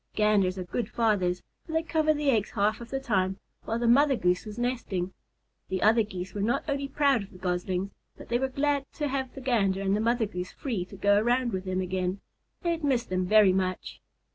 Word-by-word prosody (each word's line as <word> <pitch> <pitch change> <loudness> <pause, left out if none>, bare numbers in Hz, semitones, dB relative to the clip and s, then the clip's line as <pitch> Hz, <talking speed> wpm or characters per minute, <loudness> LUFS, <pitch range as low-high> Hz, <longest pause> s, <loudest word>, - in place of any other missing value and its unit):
Ganders 205 -3 +3
are 185 - -3
good 225 +7 -3
fathers, 190 -6 +1 0.2
for 320 - -9
they 320 0 +1
cover 315 -1 +2
the 295 -2 +2
eggs 220 -4 +1
half 215 +2 0
of 235 - -9
the 270 - -2
time, 190 -7 0 0.3
while 225 - -1
the 235 0 0
Mother 275 +3 +5
Goose 180 -1 0
is 210 +1 -8
resting. 230 -7 -2 0.6
The 190 0 -1
other 225 +2 +5
Geese 190 -3 -5
were 205 - -3
not 240 +9 0
only 280 -1 -1
proud 275 -4 +2
of 200 - -9
the 185 - -13
Goslings, 180 +1 -2 0.3
but - - -11
they 240 +1 +1
were 265 - +1
glad 280 +1 0
to 295 -2 -2
have 265 -1 -3
the 270 - -7
Gander 205 -7 +1
and 195 0 +2
the 210 - 0
Mother 235 0 +2
Goose 180 -3 -5
free 225 -10 -3
to 190 - -12
go 205 +1 +4
around 240 +1 +1
with 190 0 -3
them 185 0 -1
again. 185 +1 -2 0.4
They 345 - +1
had 330 -2 -3
missed 260 -5 +1
them 185 0 0
very 210 -2 +6
much. 185 -1 -2
215 Hz, 225 wpm, -28 LUFS, 185-260 Hz, 0.6 s, very